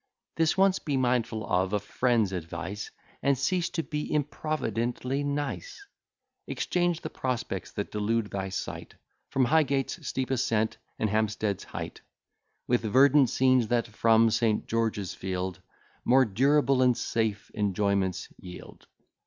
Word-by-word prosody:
This 165 +2 +2
once 190 0 +4
be 145 -4 -1
mindful 120 -3 0
of 95 +2 0
a 105 - +2
friend's 110 0 +1
advice, 90 +3 -5 0.3
And 140 -1 +2
cease 175 +6 0
to 165 - -2
be 150 -1 -4
improvidently 135 -3 -1
nice; 145 - -4 0.6
Exchange 175 -2 0
the - - -5
prospects 125 -7 -3
that 100 - -4
delude 105 +1 -1
thy 95 -1 -3
sight, 95 - -6 0.3
From 130 -1 +2
Highgate's 140 -1 +1
steep 130 0 -2
ascent 115 -4 +1 0.2
and 110 - +1
Hampstead's 110 -2 0
height, - - -7 0.6
With 120 0 +2
verdant 130 +4 +5
scenes, 130 -2 +3
that, 120 +1 +1
from 115 +1 +4
St. 110 -1 +1
George's 110 -4 -1
Field, 95 -1 -4 0.4
More 130 +2 +5
durable 135 +5 +3
and 125 -2 +4
safe 110 -3 -2
enjoyments 100 -2 0
yield. 90 -1 -11
115 Hz, 130 wpm, -28 LUFS, 105-135 Hz, 0.6 s, verdant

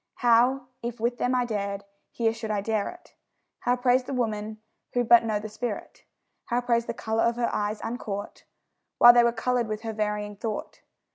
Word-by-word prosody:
How, 245 +2 +3 0.2
if 235 0 -5
with 240 +2 -1
them 250 +1 +1
I 250 -1 +2
dared, 200 -3 -3 0.3
here 225 -1 0
should 225 -1 -6
I 210 -1 0
dare 215 0 -1
it? 355 0 -14 0.5
How 245 - +1
praise 250 0 +2
the 275 - -4
woman, 215 -3 -2 0.4
who 245 - +2
but 235 0 +6
know 220 -2 0
the 215 - -6
spirit? 215 0 -6 0.4
How 240 0 0
praise 235 -1 0
the - - -3
colour 220 -1 -1
of 235 0 +2
her 240 -1 -1
eyes, 210 +1 -1
uncaught 210 -4 -5 0.5
While 240 0 +9
they 240 0 +6
were 235 - +3
coloured 240 0 0
with 215 0 -4
her 225 -1 -3
varying 210 -1 -2
thought? 215 0 -5
230 Hz, 195 wpm, -26 LUFS, 215-245 Hz, 0.5 s, While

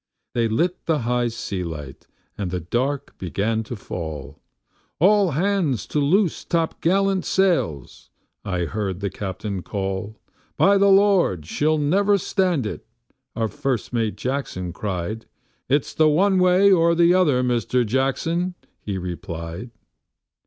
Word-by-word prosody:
They 115 -1 +1
lit 170 +12 -1
the 155 -4 +1
high 120 0 +1
sea 100 -5 -4
light, 75 -5 -8 0.3
and 100 -3 -3
the 90 0 -2
dark 130 - -2
began 105 +5 -1
to 120 - -6
fall. 80 - -7 0.6
"All 200 +3 +4
hands 170 - 0
to 150 - 0
loose 175 +5 +2
topgallant 185 +3 +1
sails," 165 - 0 0.3
I 90 -3 -2
heard 95 +1 -3
the 100 -1 -3
captain 95 0 -5
call. 95 +2 -4 0.4
"By 200 0 +5
the 200 0 +5
Lord, 195 - +4
she'll 155 - +1
never 195 +8 +3
stand 180 - 0
it," 105 - -5 0.5
our 115 -1 0
first 135 -3 -3
mate 115 -3 0
Jackson, 125 -10 -3
cried. 100 +3 -4 0.4
..."It's 140 +1 +1
the 155 -1 +4
one 190 +5 +3
way 185 +2 +5
or 170 -2 +4
the 170 +1 +5
other, 150 -9 +3
Mr. 125 0 +1
Jackson," 160 - 0 0.3
he 100 -2 -4
replied. 85 +2 -6
125 Hz, 135 wpm, -23 LUFS, -, 0.6 s, By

